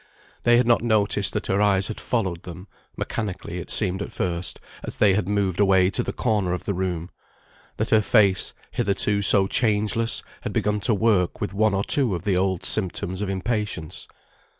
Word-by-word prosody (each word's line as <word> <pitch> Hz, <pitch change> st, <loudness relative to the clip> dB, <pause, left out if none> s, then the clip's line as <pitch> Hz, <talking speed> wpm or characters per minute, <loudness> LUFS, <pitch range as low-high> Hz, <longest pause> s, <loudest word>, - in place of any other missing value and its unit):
They 120 Hz, 0 st, +6 dB
had 125 Hz, -, +3 dB
not 120 Hz, 0 st, +3 dB
noticed 110 Hz, -3 st, +1 dB
that -, -, -2 dB
her 95 Hz, +2 st, +1 dB
eyes 100 Hz, -2 st, +2 dB
had 110 Hz, -, -6 dB
followed 95 Hz, -8 st, -2 dB
them 90 Hz, +2 st, -10 dB, 0.3 s
(mechanically 95 Hz, -5 st, -4 dB
it -, -, -8 dB
seemed 95 Hz, -2 st, +3 dB
at 100 Hz, -, -5 dB
first) 85 Hz, 0 st, -3 dB, 0.2 s
as -, -, -7 dB
they 100 Hz, -3 st, +4 dB
had 95 Hz, -1 st, 0 dB
moved 100 Hz, -3 st, 0 dB
away 95 Hz, -2 st, +4 dB
to -, -, -1 dB
the -, -, -3 dB
corner 105 Hz, -7 st, 0 dB
of 90 Hz, -, -4 dB
the 100 Hz, -, -2 dB
room; 90 Hz, -2 st, -3 dB, 0.7 s
that -, -, -2 dB
her 110 Hz, -, +5 dB
face, 100 Hz, -3 st, +3 dB, 0.2 s
hitherto 100 Hz, +1 st, 0 dB
so 100 Hz, 0 st, +4 dB
changeless, 110 Hz, +2 st, 0 dB, 0.2 s
had -, -, -5 dB
begun 105 Hz, 0 st, 0 dB
to 110 Hz, -, +4 dB
work 100 Hz, -4 st, +1 dB
with 100 Hz, -, -3 dB
one 105 Hz, 0 st, +2 dB
or 100 Hz, -, 0 dB
two 125 Hz, -7 st, +1 dB
of 85 Hz, -, -6 dB
the 100 Hz, -2 st, +1 dB
old 95 Hz, -1 st, 0 dB
symptoms 95 Hz, -2 st, -2 dB
of 105 Hz, -, -2 dB
impatience. 95 Hz, -4 st, -3 dB
100 Hz, 190 wpm, -24 LUFS, 95-110 Hz, 0.7 s, They